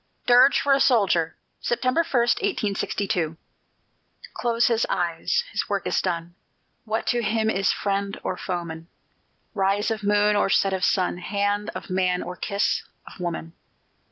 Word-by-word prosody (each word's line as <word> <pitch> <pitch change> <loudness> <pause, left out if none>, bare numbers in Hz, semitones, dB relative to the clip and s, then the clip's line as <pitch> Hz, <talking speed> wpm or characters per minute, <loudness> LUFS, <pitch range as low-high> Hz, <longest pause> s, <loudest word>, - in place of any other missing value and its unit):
DIRGE 250 +3 +6
FOR 280 - +3
A 275 - +3
SOLDIER 195 -11 +2 0.2
[September 255 +6 +1
1, 265 -7 +1 0.2
1862] 200 - -1 1.0
Close 235 0 +1
his 230 -1 +2
eyes; 175 - 0
his - - -2
work - - -1
is - - +1
done! 170 -2 -3 0.5
What 220 0 -2
to 240 -1 +1
him 220 0 +1
is 195 -1 +1
friend 200 0 -2
or - - -2
foeman, 170 -3 -5 0.7
Rise 200 +1 +1
of 220 -1 -2
moon, 210 0 +3
or 205 - +2
set 195 0 +2
of 190 -1 -2
sun, 180 -2 +1
Hand 205 +3 -1
of - - -7
man, 185 -1 +1
or 180 - -6
kiss 200 +3 0 0.2
of - - -13
woman? 170 -2 -4
200 Hz, 150 wpm, -24 LUFS, 180-225 Hz, 1.0 s, DIRGE